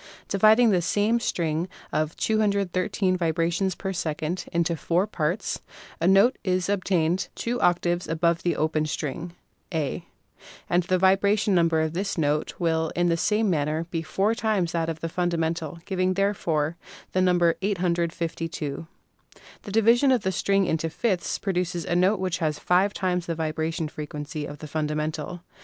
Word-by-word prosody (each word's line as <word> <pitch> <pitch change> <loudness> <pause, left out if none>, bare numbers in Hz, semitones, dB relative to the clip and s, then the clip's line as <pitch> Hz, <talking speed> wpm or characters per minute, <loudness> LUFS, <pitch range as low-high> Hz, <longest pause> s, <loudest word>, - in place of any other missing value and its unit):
Dividing 215 +3 +5
the 180 -3 +3
same 210 +6 +1
string 170 -5 -1 0.2
of 155 +1 -1
213 200 -3 +1
vibrations 170 +2 0
per 195 -1 -4
second 160 +1 -3
into 170 -1 +1
four 170 +4 +1
parts, 180 -1 -2 0.4
a 170 - +1
note 195 +7 +5
is 185 +1 0
ob 200 -2 0
tained 175 -1 +1
two 240 +1 -2
octaves 175 0 +1
above 170 0 +1
the 175 - 0
open 155 0 0
string 155 +3 -4 0.4
(A'), 160 +1 -2 0.6
and 175 +1 +3
the 185 +1 +1
vibration 195 +2 +3
number 165 -2 +3
of 160 0 -1
this 195 +3 -2
note 150 -1 0
will, 160 -2 0
in 175 0 +2
the 170 - +3
same 210 +6 +1
manner, 155 -2 0
be 165 - -1
four 195 +6 0
times 210 -7 0
that 165 -1 -1
of 160 -1 -5
the 165 - -2
fundamental, 165 -2 -1
giving 185 -1 0
therefore 170 -5 0 0.3
the 185 - +1
number 175 -2 +4
852. 170 -5 -2 0.7
The 205 - -8
division 230 +5 +4
of 250 -5 +2
the 190 - +1
string 195 +1 +1
into 165 -1 -1
fifths 185 +2 -1
pro 195 - -2
duces 175 -2 -2
a 175 - -1
note 185 +3 +3
which 185 -2 -1
has 155 -3 0
five 185 +3 +2
times 180 -3 -1
the 165 - -1
vibration 160 0 -2
frequency 150 0 -6
of 145 - -8
the 155 - -8
fundamental. 155 +2 -3
175 Hz, 160 wpm, -25 LUFS, 160-190 Hz, 0.7 s, Dividing